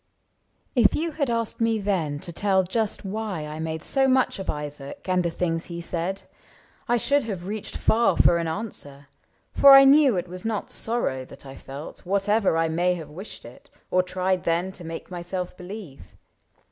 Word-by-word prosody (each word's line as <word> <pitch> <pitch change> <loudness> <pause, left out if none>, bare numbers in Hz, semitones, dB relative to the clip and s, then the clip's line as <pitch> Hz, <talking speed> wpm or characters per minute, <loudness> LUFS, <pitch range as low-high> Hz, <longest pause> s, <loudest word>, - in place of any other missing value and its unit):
If 230 -5 +5
you 330 +1 -1
had 290 -4 -1
asked 230 -1 -2
me 230 -1 +2
then 185 -8 -1
to 175 -2 -4
tell 190 +1 +2
just 210 +3 -2
why 195 -5 -3
I 150 +1 -7
made 160 0 -4
so 270 -1 +2
much 260 -5 +2
of 190 - -5
Isaac 145 0 -6
and 185 -1 +2
the 170 - 0
things 165 0 -2
He 170 -1 -6
said, 175 +3 -3 0.6
I 240 0 +3
should 265 +3 +1
have 190 -6 -5
reached 210 +2 -5
far 230 +2 +2
for 170 - +5
an 165 - -2
answer; 150 -7 -6 0.4
For 275 -1 +9
I 275 - +10
knew 275 -5 +6
it 175 0 -2
was 180 +2 -8
not 225 -2 -3
sorrow 225 - -1
that - - -14
I 135 0 -9
felt. 140 +3 -9
Whatever 200 0 +1
I 165 0 +2
may 175 +3 +1
have 160 -4 -8
wished 190 +8 -9
it, - - -14 0.2
or 185 - +4
tried 185 0 -1
then 170 +3 0
To 190 - -9
make 165 +2 -7
myself 180 +1 -5
believe. 180 -6 -10
185 Hz, 185 wpm, -25 LUFS, 165-220 Hz, 0.6 s, I